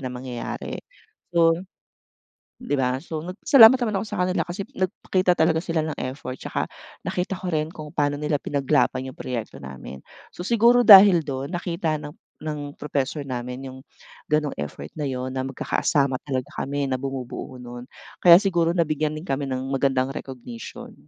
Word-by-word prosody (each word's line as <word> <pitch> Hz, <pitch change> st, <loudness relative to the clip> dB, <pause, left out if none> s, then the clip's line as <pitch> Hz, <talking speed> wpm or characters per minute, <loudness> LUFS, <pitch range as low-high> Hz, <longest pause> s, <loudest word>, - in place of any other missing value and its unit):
na 130 Hz, -, -4 dB
mangyayari." 125 Hz, -1 st, -6 dB, 0.6 s
So 165 Hz, -1 st, +6 dB, 1.1 s
'di 145 Hz, -, -2 dB
ba, 130 Hz, -1 st, +1 dB
so, 160 Hz, -1 st, -6 dB
nagpasalamat 225 Hz, -, +7 dB
naman 225 Hz, -4 st, -1 dB
ako 220 Hz, -, -5 dB
sa -, -, -5 dB
kanila 180 Hz, -1 st, 0 dB
kasi 185 Hz, +3 st, -5 dB
nagpakita 185 Hz, 0 st, 0 dB
talaga 160 Hz, 0 st, +3 dB
sila 165 Hz, -3 st, -1 dB
ng 155 Hz, -, -5 dB
effort, 130 Hz, -2 st, -7 dB
'tsaka -, -, -2 dB, 0.4 s
nakita 180 Hz, +1 st, -2 dB
ko 190 Hz, -, -8 dB
rin 155 Hz, 0 st, 0 dB
kung 155 Hz, -3 st, -9 dB
pa'no 145 Hz, 0 st, +1 dB
nila 150 Hz, 0 st, 0 dB
pinaglaban 140 Hz, -2 st, +1 dB
'yong 130 Hz, -, -9 dB
proyekto 120 Hz, -4 st, -5 dB
namin. 65 Hz, 0 st, -9 dB, 0.3 s
So, -, -, -7 dB
siguro 235 Hz, +3 st, +4 dB
dahil 195 Hz, -5 st, +9 dB
do'n 140 Hz, +3 st, -5 dB
nakita 170 Hz, -2 st, -2 dB
ng 145 Hz, -, -7 dB, 0.3 s
ng 150 Hz, -2 st, -5 dB
professor 145 Hz, 0 st, -2 dB
namin 125 Hz, 0 st, -5 dB
'yong 130 Hz, 0 st, -10 dB, 0.5 s
gano'ng 150 Hz, -1 st, +1 dB
effort 75 Hz, 0 st, -6 dB
na 150 Hz, -, -2 dB
'yon 130 Hz, 0 st, -4 dB
na 130 Hz, -, -2 dB
magkakasama 135 Hz, 0 st, 0 dB
talaga 130 Hz, -3 st, -3 dB
kami 140 Hz, +1 st, -2 dB
na 130 Hz, -, 0 dB
bumubuo 130 Hz, -1 st, -5 dB
no'n. 120 Hz, 0 st, -9 dB, 0.4 s
Kaya 170 Hz, -1 st, +9 dB
siguro 170 Hz, -4 st, +1 dB
nabigyan 155 Hz, -2 st, 0 dB
din 155 Hz, -, -8 dB
kami 140 Hz, -3 st, -2 dB
ng 130 Hz, 0 st, -3 dB
magandang 135 Hz, -1 st, +1 dB
recognition. 125 Hz, -4 st, -8 dB
145 Hz, 160 wpm, -24 LUFS, 130-170 Hz, 1.1 s, dahil